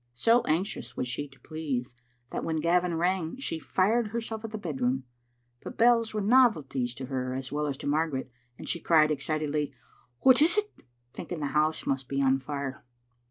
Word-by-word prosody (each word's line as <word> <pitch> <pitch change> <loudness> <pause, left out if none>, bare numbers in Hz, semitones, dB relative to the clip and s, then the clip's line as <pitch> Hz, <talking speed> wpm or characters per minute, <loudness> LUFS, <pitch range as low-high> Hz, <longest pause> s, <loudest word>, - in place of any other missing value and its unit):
So 230 - +4
anxious 170 +6 -2
was 125 - -1
she 135 +4 -3
to 135 -1 -20
please 140 -7 -4 0.4
that - - -3
when 160 - -1
Gavin 175 +2 +2
rang 175 +2 0
she 215 -11 -3
fired 215 +8 +1
herself 225 0 -4
at 225 - -4
the 215 - -5
bed 155 -10 -5
room, 130 +2 +1 0.6
but - - -8
bells 230 -1 +4
were 215 - -2
novelties 180 - +3
to 130 - -6
her 130 -1 -3
as 130 0 -5
well 150 0 -1
as 140 -2 -3
to - - -8
Margaret, 145 -3 0 0.3
and - - -9
she 170 - -1
cried, 155 -2 +4
excitedly, 150 0 -1 0.2
" 120 0 -35
What 260 +1 +6
is 330 +5 +5
't?" 420 - +3 0.5
thinking 175 - -6
the 145 - -2
house 155 +1 +1
must 135 -1 -1
be 140 - -1
on 135 -1 +3
fire. 140 0 -5
155 Hz, 195 wpm, -28 LUFS, 135-200 Hz, 0.6 s, What